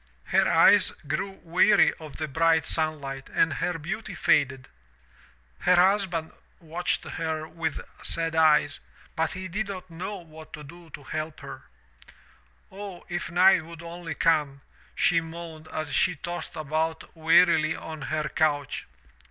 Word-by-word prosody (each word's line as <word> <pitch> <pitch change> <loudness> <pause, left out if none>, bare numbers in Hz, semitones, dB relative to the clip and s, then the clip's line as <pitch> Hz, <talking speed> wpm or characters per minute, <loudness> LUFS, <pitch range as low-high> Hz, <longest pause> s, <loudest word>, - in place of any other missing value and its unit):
Her - - +2
eyes - - +6 0.2
grew 155 +7 -1
weary 175 +2 +4
of 155 -2 -10
the 155 - -3
bright 160 +2 +2
sun 155 -1 0
light 135 -1 -7
and 160 - +2
her 180 +2 -2
beauty 195 +8 -5
faded. 135 -2 +2 0.9
Her 180 - +4
husband 180 -3 +2 0.3
watched 170 +1 -2
her 160 -1 -4
with 160 -1 -3 0.2
sad 165 -1 0
eyes, 155 -2 +4 0.4
but 160 0 0
he 185 0 -6
did 205 +4 -3
not 185 -3 -7
know 185 +5 -5
what 160 -4 -12
to 150 - -8
do 170 +3 -13
to 145 - -15
help 155 +2 -5
her. - - -9 0.5
" 65 +1 -31
*0, 195 -2 -8
if 175 +1 -3
night 180 0 +5
would 165 +1 -11
only 170 -1 -6
come,' 150 -5 +1 0.3
she 165 - +3
moaned 165 -1 -9
as 155 - -4
she 180 -2 +2
tossed 175 +4 -6
about 160 +2 -3
wearily 165 0 +4
on 155 -2 -8
her 155 -1 -2
couch. 145 -2 -1
160 Hz, 150 wpm, -26 LUFS, 155-175 Hz, 0.9 s, eyes